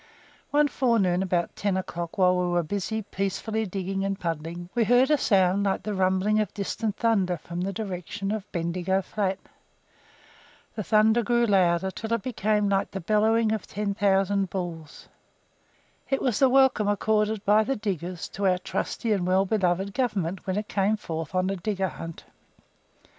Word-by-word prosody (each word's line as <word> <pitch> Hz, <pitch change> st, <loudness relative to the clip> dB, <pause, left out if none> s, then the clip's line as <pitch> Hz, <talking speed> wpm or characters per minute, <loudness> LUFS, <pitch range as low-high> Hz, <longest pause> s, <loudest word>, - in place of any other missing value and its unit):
One 295 Hz, 0 st, +3 dB
forenoon, 225 Hz, -10 st, +1 dB
about 175 Hz, -3 st, -1 dB
ten 200 Hz, -2 st, 0 dB
o'clock, 175 Hz, -1 st, -5 dB
while 185 Hz, -1 st, +4 dB
we 180 Hz, 0 st, 0 dB
were 175 Hz, 0 st, +1 dB
busy, 205 Hz, +6 st, -3 dB
peacefully 200 Hz, +3 st, -2 dB
digging 195 Hz, +1 st, -3 dB
and 195 Hz, 0 st, -2 dB
puddling, 165 Hz, 0 st, -4 dB
we 240 Hz, -, +2 dB
heard 245 Hz, +5 st, +4 dB
a -, -, +6 dB
sound 195 Hz, -3 st, +3 dB
like 195 Hz, -, 0 dB
the 210 Hz, -, -3 dB
rumbling 190 Hz, +2 st, +2 dB
of 210 Hz, -3 st, -1 dB
distant 210 Hz, +1 st, -3 dB
thunder 195 Hz, -6 st, +1 dB
from 170 Hz, +3 st, -6 dB
the 195 Hz, +2 st, -1 dB
direction 195 Hz, -1 st, -4 dB
of 210 Hz, -2 st, -5 dB
Bendigo 180 Hz, +3 st, -1 dB
flat. 195 Hz, -2 st, -1 dB, 1.4 s
The 215 Hz, -, -4 dB
thunder 220 Hz, +4 st, +4 dB
grew 240 Hz, +1 st, +2 dB
louder 185 Hz, -4 st, +3 dB
until 220 Hz, +4 st, -3 dB
it 230 Hz, -4 st, -1 dB
became 210 Hz, -4 st, 0 dB
like 195 Hz, -1 st, +1 dB
the 195 Hz, -, -5 dB
bellowing 215 Hz, +4 st, +2 dB
of 220 Hz, -2 st, -3 dB
ten 205 Hz, 0 st, -2 dB
thousand 195 Hz, -1 st, +1 dB
bulls. 170 Hz, -5 st, -6 dB, 1.0 s
It 270 Hz, -, +1 dB
was 245 Hz, -5 st, 0 dB
the 270 Hz, -, +5 dB
welcome 260 Hz, -5 st, +4 dB
accorded 210 Hz, +1 st, +1 dB
by 210 Hz, +2 st, +5 dB
the 270 Hz, +5 st, -1 dB
diggers 180 Hz, -4 st, -4 dB
to 200 Hz, 0 st, -1 dB
our 180 Hz, -1 st, +3 dB
"trusty 220 Hz, +4 st, -3 dB
and 190 Hz, -4 st, +1 dB
well 190 Hz, +1 st, +3 dB
beloved" 195 Hz, -1 st, 0 dB
Government 195 Hz, -8 st, -2 dB
when 190 Hz, +1 st, -1 dB
it 210 Hz, 0 st, -3 dB
came 205 Hz, +2 st, +1 dB
forth 165 Hz, -3 st, -5 dB
on 185 Hz, +1 st, +1 dB
a -, -, -1 dB
digger 190 Hz, 0 st, -2 dB
hunt. 165 Hz, -1 st, -8 dB
195 Hz, 170 wpm, -26 LUFS, 185-215 Hz, 1.4 s, a